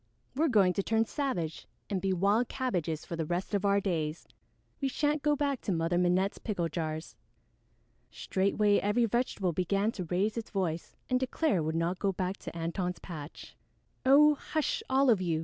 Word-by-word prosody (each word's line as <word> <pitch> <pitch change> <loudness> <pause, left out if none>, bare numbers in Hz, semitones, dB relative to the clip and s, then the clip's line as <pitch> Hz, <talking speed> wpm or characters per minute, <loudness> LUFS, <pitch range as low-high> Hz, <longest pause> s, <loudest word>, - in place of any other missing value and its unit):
"We're 315 +4 +2
going 200 -8 +4
to 195 - 0
turn 225 +3 +1
savage 215 - -3 0.2
and 195 -3 -2
be 195 - 0
wild 200 +6 +2
cabbages 175 - -2
for 170 - -5
the 165 - -2
rest 175 +5 -2
of 200 0 +1
our 200 0 +4
days! 165 -5 -2 0.5
We 275 - +1
shan't 295 +2 0
go 295 0 +2
back 280 -2 -1
to - - -2
Mother 170 0 +1
Minette's 180 +2 +1
pickle 180 -7 -2
jars." 160 -1 -4 0.9
Straightway 200 +2 +1
every 215 +4 +2
vegetable 215 -6 0
began 195 +5 +1
to 185 -6 -5
raise 195 +6 0
its 230 - -4
voice 175 -5 -2
and 255 -1 +2
declare 260 - +1
it - - +1
would 160 +1 -1
not 170 +2 0
go 200 - +1
back 185 +1 -2
to - - -8
Antone's 180 +2 -2
patch. 155 -4 -9 0.5
"Oh, 290 +3 +7
hush, 315 - -2
all 265 -1 +4
of 205 -5 +3
you!" 165 -3 0
195 Hz, 185 wpm, -30 LUFS, 175-240 Hz, 0.9 s, Oh